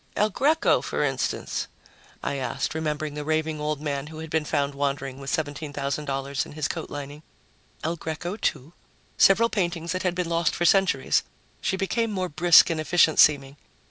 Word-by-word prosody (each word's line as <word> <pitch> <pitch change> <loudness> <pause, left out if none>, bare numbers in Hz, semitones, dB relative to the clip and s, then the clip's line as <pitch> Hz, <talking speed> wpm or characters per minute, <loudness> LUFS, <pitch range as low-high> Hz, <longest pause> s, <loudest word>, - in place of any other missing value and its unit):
"El 210 +1 +2
Greco, 305 - +2
for - - -2
instance?" - - -2 0.6
I 140 - -2
asked, 135 +2 -2
remembering 155 -1 -3
the 150 0 -5
raving 155 0 -1
old 150 -1 -2
man 145 -1 -3
who 155 0 -10
had 160 -1 -8
been 160 -1 0
found 145 -2 0
wandering 140 -1 -3
with 135 0 -6
$17,000 145 -3 -3
in - - -12
his 155 -1 -2
coat - - -5
lining. 145 +1 -7 0.6
"El 165 +2 -1
Greco, 165 +4 -4
too. 155 - -2 0.5
Several 225 +4 +6
paintings 175 -6 -2
that 185 0 -2
had 180 -1 -1
been 180 -1 -1
lost 170 -1 0
for 175 - 0
centuries." 185 -8 +3 0.4
She 190 - -1
became 225 +4 0
more 185 -3 -2
brisk 170 +2 +6
and 160 -1 -1
efficient 160 -1 +3
seeming. 140 -1 +4
155 Hz, 175 wpm, -25 LUFS, 145-175 Hz, 0.6 s, Several